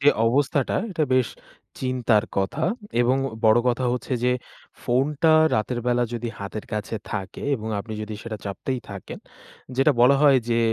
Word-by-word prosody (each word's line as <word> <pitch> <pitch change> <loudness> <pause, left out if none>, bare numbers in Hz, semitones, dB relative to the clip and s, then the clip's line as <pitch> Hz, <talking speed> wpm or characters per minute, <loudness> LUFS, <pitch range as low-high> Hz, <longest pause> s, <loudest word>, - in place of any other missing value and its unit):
যে, 140 - +5 0.2
অবস্থাটা 135 +3 +1 0.2
এটা 165 -4 -1
বেশ 130 -3 +3 0.5
চিন্তার 125 -4 +2
কথা 100 +10 -1 0.4
এবং 125 +2 +3 0.3
বড় 110 +1 +6
কথা 125 +1 0
হচ্ছে 125 +1 -4
যে 125 - +4 0.5
ফোনটা 140 +6 +1 0.3
রাতের 120 +3 -1
বেলা 125 0 +2
যদি 120 0 -3
হাতের 100 +2 -5
কাছে 105 +1 -3 0.2
থাকে 100 -3 -5
এবং 110 -2 -5
আপনি 110 +2 -6
যদি 105 0 -5
সেটা 110 -2 -5
চাপতেই 120 +6 -3
থাকেন, 100 -2 -8 0.6
যেটা 135 +2 +4
বলা 130 +3 +6
হয় 140 -2 +7
যে, 115 - +2
120 Hz, 155 wpm, -24 LUFS, 110-130 Hz, 0.6 s, হয়